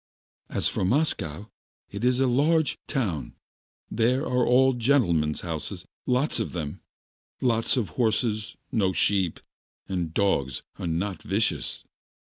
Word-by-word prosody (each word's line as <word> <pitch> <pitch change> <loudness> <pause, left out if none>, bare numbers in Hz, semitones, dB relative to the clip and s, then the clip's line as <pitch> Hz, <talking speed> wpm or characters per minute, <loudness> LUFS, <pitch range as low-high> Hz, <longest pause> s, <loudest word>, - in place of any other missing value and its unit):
"As - - +1
for 105 - -1
Moscow, 105 - 0 0.4
it 100 +3 -5
is 125 0 +3
a 135 - +4
large 145 +5 +2
town, 100 - -2 0.6
there 125 +6 +2
are 125 0 +1
all 130 +2 +5
gentlemen's 110 - +2
houses, 80 -4 -5 0.2
lots 125 +2 +1
of 110 - -2
horses, 110 0 0
no 95 -5 +1
sheep, 95 0 +2 0.5
and 90 -3 -1
the 80 - -15
dogs 70 -11 +1 0.2
are - - -3
not 90 +4 -2
vicious. 95 - -1
110 Hz, 115 wpm, -26 LUFS, 85-125 Hz, 0.6 s, all